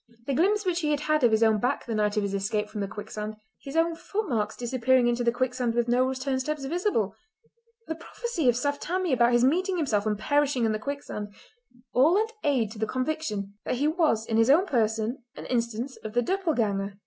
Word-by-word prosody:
The 275 - -1
glimpse 405 +8 +2
which 355 -2 +1
he 305 -3 -1
had 305 0 0
of 240 - +6
his 220 0 +3
own 220 -1 +4
back 250 +6 -1
the 230 - -3
night 210 0 0
of 210 - +2
his 200 -1 -2
escape 210 +2 -1
from 210 -1 -5
the 200 - -1
quicksand—his 215 +5 -8
own 330 +1 +3
footmarks 315 - -2
disappearing 250 +1 +2
into 240 0 +1
the 235 - +3
quicksand 250 -1 -1
with 240 0 +1
no 245 +2 +3
return 260 0 -1
steps 295 +1 -3
visible—the 355 - -4
prophecy 335 - -2
of 240 - +3
Saft 285 +3 -1
Tammie 360 -2 -1
about 240 -1 +4
his 240 0 +4
meeting 365 +7 +1
himself 220 -10 0
and 210 -1 0
perishing 285 0 +1
in 220 - +2
the 215 - -1
quicksand—all 270 - -2
lent 440 +2 +1
aid 255 -8 +1
to 220 - -9
the 220 - 0
conviction 255 -7 -2
that - - -1
he 285 +4 +1
was 310 -9 +1
in 225 - 0
his 225 +2 +4
own 330 +7 +6
person 225 - 0
an - - -8
instance 235 +1 -2
of 215 - -8
the 245 - +3
döppleganger. 225 - -1
250 Hz, 205 wpm, -27 LUFS, 220-310 Hz, -, of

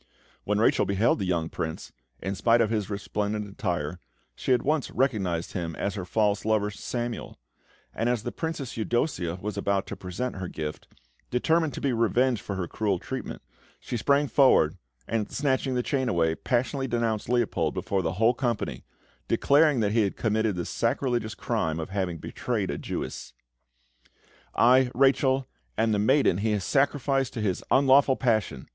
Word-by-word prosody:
When 105 0 +1
Rachel 110 - +3
beheld 100 +5 +2
the 100 - -1
young 85 -3 0
Prince, 80 -1 -5 0.3
in 95 - -2
spite 115 +4 +3
of 115 -2 +2
his 105 -3 -1
resplendent 105 +1 -2
attire, 90 - -3 0.3
she - - -3
at 125 -2 +3
once 150 0 0
recognised 95 -11 -1
him 85 -3 -3
as 100 - -2
her 95 -3 -5
false 105 +2 +1
lover, 105 -1 +1
Samuel; 120 +3 -5 0.6
and 115 +2 0
as 120 -3 0
the - - -3
Princess 160 -6 -4
Eudossia 110 - -1
was 105 0 -4
about 100 -1 0
to - - -6
present 95 +6 -4
her 95 -1 -4
gift, 75 -2 -6 0.4
determined 160 +5 +1
to - - -6
be 135 -3 +1
revenged 120 0 +2
for 100 - -5
her 90 -2 -3
cruel 100 -1 -1
treatment, - - -6 0.4
she - - -5
sprang 140 +5 +2
forward, 130 - +4 0.3
and, 110 -2 -2
snatching 130 -2 0
the 125 - 0
chain 130 -3 0
away, 80 -5 +2
passionately 130 - -1
denounced 115 -3 -1
Leopold 120 -2 +1
before 100 -1 -1
the 80 -1 -1
whole 110 +6 +3
company, 120 -4 -2 0.4
declaring 145 -3 +4
that 100 -1 +1
he 115 +1 +3
had 100 -2 -1
committed 110 -2 +1
the 85 -1 -3
sacrilegious 120 -5 -1
crime 80 0 -1
of 80 +3 -5
having 95 -4 -2
betrayed - - -3
a - - -4
Jewess. - - -5 1.2
"I, 125 +2 +5
Rachel, 135 0 +3 0.3
am 115 - +2
the 105 - +1
maiden 110 -4 +3
he 110 +1 +1
has 100 -2 -1
sacrificed 135 +3 +1
to 115 - -4
his 100 -4 -1
unlawful 135 0 +5
passion!" 110 - 0
110 Hz, 170 wpm, -27 LUFS, 95-130 Hz, 1.2 s, I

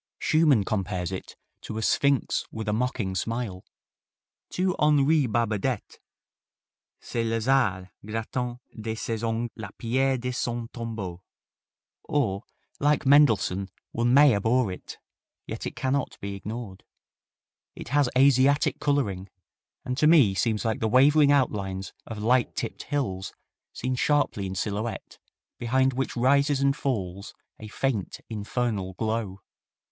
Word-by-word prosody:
Schumann 155 -9 +3
compares 95 -3 -2
it 95 - -7 0.3
to 110 - -6
a 110 - -2
"sphinx 140 +2 +1
with 110 -1 -6
a 105 - +1
mocking 115 -4 -1
smile." 105 -1 -3 0.9
To 185 0 0
Henri 150 -1 +4
Barbadette 115 +1 -1 1.0
"C'est 115 - -3
Lazare 115 -5 +1
grattant 120 +3 -3 0.2
de 110 0 -4
ses 110 0 -3
ongles 115 +1 -1
la 110 -4 -7
pierre 130 +3 +1
de 125 +1 -3
son 120 -1 -3
tombeau," 110 -7 -6 0.8
or, 105 -10 0 0.4
like 150 +1 +2
Mendelssohn, 110 -9 +4 0.2
one 120 +1 +1
may 140 0 +7
abhor 110 +2 +2
it, 90 - -9 0.5
yet - - -5
it - - -7
cannot 135 +1 -1
be 100 0 -5
ignored. 105 0 -7 0.9
It - - -9
has 145 -1 +3
Asiatic 140 +2 +4
coloring, 100 -10 0 0.6
and 125 +2 -2
to 150 - +5
me 145 -12 +6
seems 110 +3 0
like 110 -1 0
the 110 - 0
wavering 145 +4 +5
outlines 100 -9 0
of 110 - -6
light 120 +4 +2
tipped - - -4
hills 95 -11 -2 0.4
seen 130 - -3
sharply 130 -7 +1
en 95 - -5
silhouette, 105 +3 -4 0.4
behind 130 +2 +2
which 130 0 -3
rises 140 +3 +3
and 140 0 +2
falls 100 -9 -3 0.2
a 110 - -8
faint, 110 -3 -2
infernal 105 -3 -2
glow. 110 -3 -2
115 Hz, 130 wpm, -26 LUFS, 105-135 Hz, 1.0 s, may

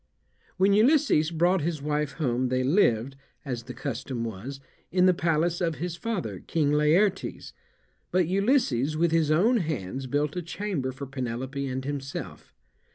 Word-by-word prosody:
When 195 +2 +4
Ulysses 225 - +4
brought 175 +2 +2
his 160 0 -2
wife 150 0 -1
home 130 -4 0
they 130 0 +1
lived, 135 - +2 0.3
as 125 -4 -3
the 125 - -7
custom 130 -2 -4
was, 115 +5 -6 0.3
in 180 +1 +4
the 185 - +6
palace 170 +1 0
of 165 -2 0
his 170 +1 -4
father, 225 0 -3
King 150 -3 0
Laertes, 170 +7 +1 0.6
but 180 -2 +2
Ulysses, 180 - +1
with 170 0 +2
his 165 -2 +2
own 205 +11 +4
hands, 135 - -3
built 145 +4 -1
a 180 - -2
chamber 170 -6 -3
for 130 +2 -7
Penelope 130 +1 -4
and 130 0 -4
himself. 140 -1 -6
150 Hz, 155 wpm, -27 LUFS, 130-180 Hz, 0.6 s, the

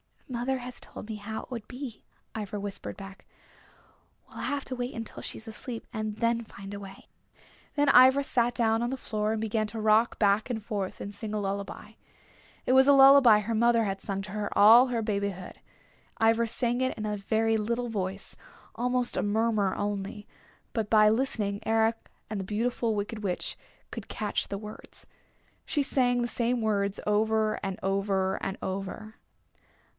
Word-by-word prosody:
"Mother 255 +1 -2
has 250 0 -7
told 210 - -10
me 220 - -4
how 220 +2 -6
it - - -15
would 235 -4 -6
be," 255 -2 -8 0.3
Ivra 210 -1 -4
whispered 200 0 -6
back. 195 0 -11 1.0
"We'll - - -11
have 285 -1 -2
to 255 - -4
wait 245 +1 -4
until 225 -1 -6
she's 225 - -6
asleep 225 +1 -6
and 215 -2 -3
then 235 +1 +1
find 200 -1 -10
a 200 - -5
way." 195 -1 -11 0.7
Then 290 -1 +3
Ivra 260 +2 +7
sat 240 -2 +1
down 225 -1 +2
on 240 - 0
the 265 - -3
floor 215 -3 -2
and 220 - -2
began 220 0 0
to 225 +1 -5
rock 215 +2 +3
back 205 +2 +2
and 220 -4 -3
forth 205 -4 -4
and 200 - -6
sing 215 0 -6
a - - 0
lullaby. 200 +1 -4 0.7
It - - +1
was 265 +1 +6
a 285 - +8
lullaby 270 -5 +8
her 225 +2 -3
mother 230 +1 +3
had 195 -2 -3
sung 195 -1 -3
to 195 - -9
her 210 0 -3
all 230 +5 +8
her 235 -3 -1
babyhood, 200 -3 -3 0.6
Ivra 225 +1 +3
sang 240 +2 0
in 255 -4 -1
a 210 0 -2
very 220 +2 +1
little 235 +3 -2
voice, 195 -2 -4 0.4
almost 250 +1 0
a - - +2
murmur 210 -1 +1
only, 205 0 -4 0.5
but 220 -3 -2
by 215 -1 +6
listening 215 -4 0
Eric 225 0 +1 0.2
and 210 -2 -3
the 190 - -4
Beautiful 225 +2 -1
Wicked 210 +2 -4
Witch 185 -4 -2 0.4
could - - -7
catch 210 -2 -2
the 200 - -4
words. 210 +1 -10 0.6
She 290 - 0
sang 245 -3 +2
the 240 - 0
same 240 0 -1
words 200 -2 0
over 215 +1 +2
and 195 -1 -3
over 195 0 0
and 195 - -3
over. 195 +3 -5
220 Hz, 175 wpm, -28 LUFS, 205-240 Hz, 1.0 s, a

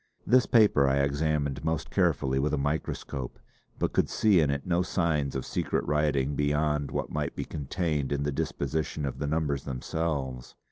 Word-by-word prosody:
This 125 -1 +4
paper 105 - +5
I 65 +1 +2
examined 70 -1 0
most 80 -1 -2
carefully 65 0 +1
with 75 +2 +1
a - - -3
microscope; 70 -3 -3 0.4
but - - -1
could - - +2
see 105 -5 +4
in 75 -3 +3
it 70 0 -2
no 90 0 +2
signs 75 -7 0
of 65 - -3
secret - - -1
writing 75 -2 +1
beyond 75 0 +1
what - - -3
might 75 -1 -2
be - - -3
contained 75 -1 -2
in 70 0 0
the 75 - 0
disposition 75 +1 -2
of 70 - -4
the 70 - -2
numbers 75 -3 0
themselves. 65 -1 -3
75 Hz, 175 wpm, -28 LUFS, 70-80 Hz, 0.4 s, paper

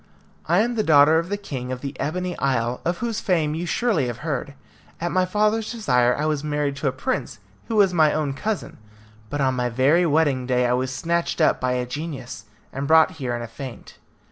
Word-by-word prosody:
I 175 +5 +4
am 240 +2 0
the 220 -2 0
daughter 155 0 +6
of 170 +2 -4
the 205 - -1
king 130 -11 -6
of 130 -1 -4
the 140 0 -5
Ebony 180 +4 -2
Isle, 125 -2 0
of 175 +1 -1
whose 225 -2 -2
fame 160 -6 +1
you 170 +3 -3
surely 205 - +1
must 120 -1 -4
have 150 - -11
heard. 140 -2 -3 0.4
At 175 +1 -2
my 185 0 +2
father's 215 +3 +1
desire 125 - +2
I 150 - -1
was 150 -2 -1
married 150 -2 -1
to 140 - -2
a - - +2
prince 130 -1 -3 0.3
who 225 - -2
was 200 -3 +4
my 155 -3 +4
own 150 -3 -1
cousin; 210 - -4 0.5
but 145 +3 -2
on 130 -1 +2
my 125 -1 -1
very 140 +9 +3
wedding 145 -5 +1
day, 125 -1 +2
I 120 - +2
was 130 +1 -1
snatched 170 +6 -1
up 155 - +3
by 130 0 +1
a 125 0 -1
genius, 135 -1 -6 0.3
and 135 +1 -3
brought 160 +3 +6
here 125 -2 -1
in 120 - -4
a - - -6
faint. 125 +2 -10
150 Hz, 220 wpm, -23 LUFS, 130-175 Hz, 0.5 s, daughter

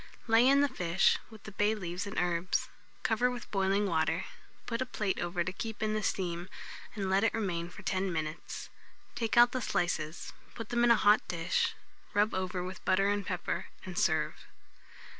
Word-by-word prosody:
Lay 230 +2 +5
in 280 +1 +6
the 285 - +4
fish, 180 -8 +2
with 220 -2 -14
the 215 - -8
bay 210 +2 +2
leaves 180 0 -4
and 200 - -7
herbs; 175 0 0 0.3
cover 235 +3 +2
with 245 -2 -7
boiling 195 +1 +2
water; 165 -1 +1 0.4
put 230 +1 -2
a - - +1
plate 205 -5 -1
over 175 0 -1
to 185 - -4
keep 220 +3 -5
in 215 0 +1
the 215 - 0
steam, 175 -3 -2 0.5
and 200 -3 -2
let 190 +2 +3
it 225 - +2
remain 175 -6 -2
for - - -12
10 190 0 0
minutes. 155 -1 -4 0.4
Take 230 -1 -1
out 240 0 +8
the 255 - -2
slices, 160 -6 -2 0.2
put 225 -1 -6
them 240 0 +2
in 240 - +5
a 235 - +8
hot 210 0 +5
dish, 170 0 0 0.4
rub 210 +2 +3
over 185 -1 -2
with 185 +3 -7
butter 195 +1 +3
and 205 0 0
pepper, - - -3 0.2
and - - -7
serve. - - +2
195 Hz, 190 wpm, -31 LUFS, 175-220 Hz, 0.5 s, out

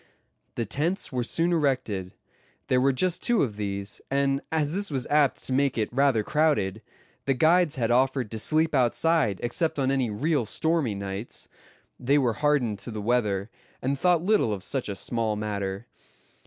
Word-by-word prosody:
The 115 - -2
tents 160 - -1
were 125 -2 -1
soon 165 +8 +1
erected. 125 - -1 0.5
There 125 0 +3
were 135 +1 +4
just 180 +7 0
two 240 -3 +3
of 110 -7 -3
these; 100 -1 -4
and 140 0 +1
as 155 -1 0
this 200 +2 -2
was 135 -4 -2
apt 145 -2 +2
to 130 - -2
make 140 -1 +1
it 110 +1 -1
rather 135 -4 +3
crowded, 110 -9 +1 0.4
the 135 - +1
guides 160 +3 +3
had 120 -3 0
offered 130 -2 +1
to 110 - -4
sleep 155 +6 +2
outside 130 - +2
except 155 +7 -1
on 135 -1 +1
any 130 -4 +1
real 135 +3 0
stormy 160 -3 0
nights. 100 +3 -6 0.5
They 135 +4 +2
were 125 -5 +2
hardened 130 -6 +1
to 100 - -6
the 110 -2 -5
weather, 105 -2 0 0.3
and 135 +2 -1
thought 175 +3 +2
little 205 - +3
of 100 -3 -4
such 130 +1 -2
a 100 - -3
small 115 0 -1
matter. 100 -1 -4
130 Hz, 175 wpm, -26 LUFS, 110-150 Hz, 0.5 s, were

